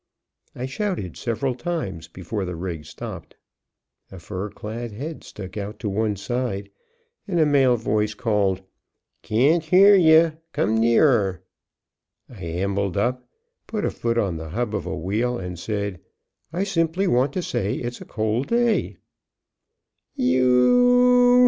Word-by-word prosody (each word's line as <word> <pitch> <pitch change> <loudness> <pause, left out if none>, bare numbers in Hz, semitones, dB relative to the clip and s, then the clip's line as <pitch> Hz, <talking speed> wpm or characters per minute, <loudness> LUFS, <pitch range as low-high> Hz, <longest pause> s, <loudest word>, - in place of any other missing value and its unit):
I 125 - -4
shouted 170 - -3
several 120 +3 -2
times 120 - -4
before 95 +4 -5
the 90 -1 -4
rig 85 -3 -5
stopped. - - -9 0.8
A 95 - -9
fur 95 +3 -5
clad 115 +3 -6
head 145 +9 -6
stuck 95 -1 -9
out 105 +1 -5
to 105 0 -3
one 105 +1 0
side, 100 -1 -3 0.6
and 175 -4 0
a 155 - +5
male 135 -4 +4
voice 105 -1 -1
called: 100 -4 0 0.6
"Can't 140 +10 +2
hear 190 +5 +6
ye; 165 -3 +6 0.2
come 110 +3 +1
nearer." 115 -4 +3 0.8
I 105 -7 -12
ambled 95 +3 -2
up, 125 +4 -1 0.4
put 215 -2 -2
a - - 0
foot 115 0 -2
on 95 -7 0
the 80 0 -7
hub 110 +5 -2
of 105 - -3
a - - -3
wheel, 110 +8 -1
and 90 -2 -6
said, 100 -2 -3 0.5
"I 180 +4 -1
simply 175 -1 0
want 130 -4 +2
to 185 - -2
say, 100 -8 -1
it's 120 0 -5
a - - -8
cold 110 +4 -1
day." 235 -4 +1 1.2
"You 245 - +5
115 Hz, 145 wpm, -23 LUFS, 100-155 Hz, 1.2 s, hear